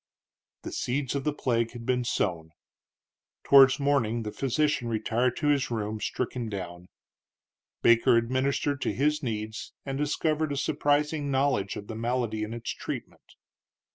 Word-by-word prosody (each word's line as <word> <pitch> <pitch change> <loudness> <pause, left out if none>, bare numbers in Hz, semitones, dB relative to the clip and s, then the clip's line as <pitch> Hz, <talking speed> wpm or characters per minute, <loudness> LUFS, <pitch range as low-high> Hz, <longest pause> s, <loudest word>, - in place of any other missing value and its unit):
The - - -6
seeds 130 +1 -2
of 140 -1 -3
the 150 - +2
plague 115 -5 -1
had 120 -1 -8
been 125 0 +1
sown. 85 -9 -1 0.9
Towards 135 -1 +7
morning 125 -5 +1
the 105 - -4
physician 135 0 0
retired 115 +2 0
to 150 - +1
his 140 -2 +2
room, 110 -2 -3
stricken 120 -2 -3
down. 90 -3 -6 1.0
Baker 115 0 +5
administered 130 +4 0
to - - 0
his 150 +2 +1
needs, 110 -3 -4
and 135 0 -3
discovered 155 +1 0
a 140 - -2
surprising 145 +1 +1
knowledge 130 -9 +1
of 100 - -7
the 110 - -7
malady 115 -1 -1
and 110 +2 -5
its 120 - -4
treatment. - - -8
125 Hz, 145 wpm, -28 LUFS, 110-140 Hz, 1.0 s, Towards